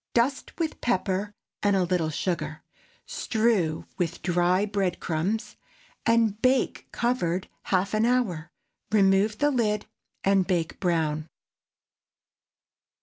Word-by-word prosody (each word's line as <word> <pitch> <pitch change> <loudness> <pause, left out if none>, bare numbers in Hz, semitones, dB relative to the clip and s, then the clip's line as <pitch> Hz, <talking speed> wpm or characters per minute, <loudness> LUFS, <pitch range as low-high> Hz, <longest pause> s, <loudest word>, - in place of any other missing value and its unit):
Dust 255 +4 0
with 320 -2 -2
pepper 195 -3 0 0.3
and 205 -1 +3
a 190 - +3
little 175 -3 0
sugar. 155 -1 -3 0.4
Strew 215 -9 0
with 170 -2 -2
dry 180 +2 +2
bread 195 -4 -1
crumbs, 180 +8 -2 0.5
and 225 -2 +3
bake 255 0 +1
covered 190 -8 0 0.2
half 190 +1 +1
an 215 +2 +3
hour; 205 -11 0 0.4
remove 200 +1 +4
the 290 +3 +2
lid 210 -5 0 0.4
and 195 -1 +3
bake 175 -4 -1
brown. 160 -4 0
195 Hz, 110 wpm, -26 LUFS, 175-225 Hz, 0.5 s, remove